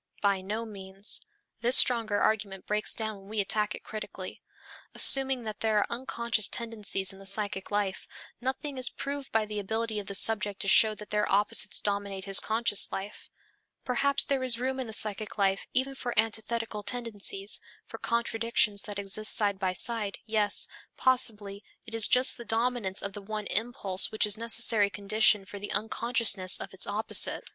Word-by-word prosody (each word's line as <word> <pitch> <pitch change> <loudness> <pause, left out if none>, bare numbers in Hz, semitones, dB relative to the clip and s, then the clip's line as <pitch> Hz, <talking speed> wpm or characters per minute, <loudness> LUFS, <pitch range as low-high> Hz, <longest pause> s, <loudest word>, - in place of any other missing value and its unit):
By 200 -2 +1
no 215 +4 -5
means; 195 -1 0 0.4
this 240 +3 +8
stronger 225 -4 +5
argument 200 -3 -1
breaks 210 0 +2
down 220 -2 -4
when 195 +1 -17
we 215 0 -2
attack 210 +1 0
it - - -13
critically. 215 -1 -8 0.5
Assuming 270 -2 +7
that 215 -1 -7
there 220 -1 0
are 205 - +2
unconscious 235 -3 -1
tendencies 210 -5 -1
in 195 - -15
the 195 - -13
psychic 200 -1 -1
life, 205 -2 -3 0.3
nothing 265 +2 -4
is 255 - +1
proved 280 0 -6
by 220 -1 +1
the 210 0 -5
ability 220 +2 -3
of 200 - -9
the 200 - -4
subject 205 -1 +2
to - - -3
show 215 +2 +5
that 210 -1 -12
their 210 0 -1
opposites 205 +1 +2
dominate 200 -2 -3
his 195 -1 +4
conscious 220 -2 +1
life. 195 +2 -8 0.6
Perhaps 280 +3 +1
there 275 -2 -1
is 255 -3 +2
room 260 +2 -3
in 255 - -4
the - - -8
psychic 215 -1 -2
life 195 -1 0
even 265 +2 0
for 245 -3 -6
antithetical 220 0 -2
tendencies, 210 -3 0 0.3
for - - -10
contradictions 230 -3 0
which 205 -1 -7
exist 200 +2 0
side 200 -2 +1
by 190 -2 -1
side, 210 +1 0
yes, 215 -2 +1 0.3
possibly 210 -6 0 0.2
it 225 - -11
is 225 -1 +6
just 255 +1 +3
the 235 - -9
dominance 225 -4 -2
of 200 - -5
the 205 - -8
one 210 +1 -6
impulse 210 -5 -2
which 215 - +1
is 210 - -1
the 220 - -8
necessary 230 -3 +3
condition 210 0 +1
for 200 +1 -10
the 205 - -6
unconsciousness 220 -4 +1
of - - -8
its 190 - +1
opposite. 210 +2 0
215 Hz, 180 wpm, -28 LUFS, 200-230 Hz, 0.6 s, this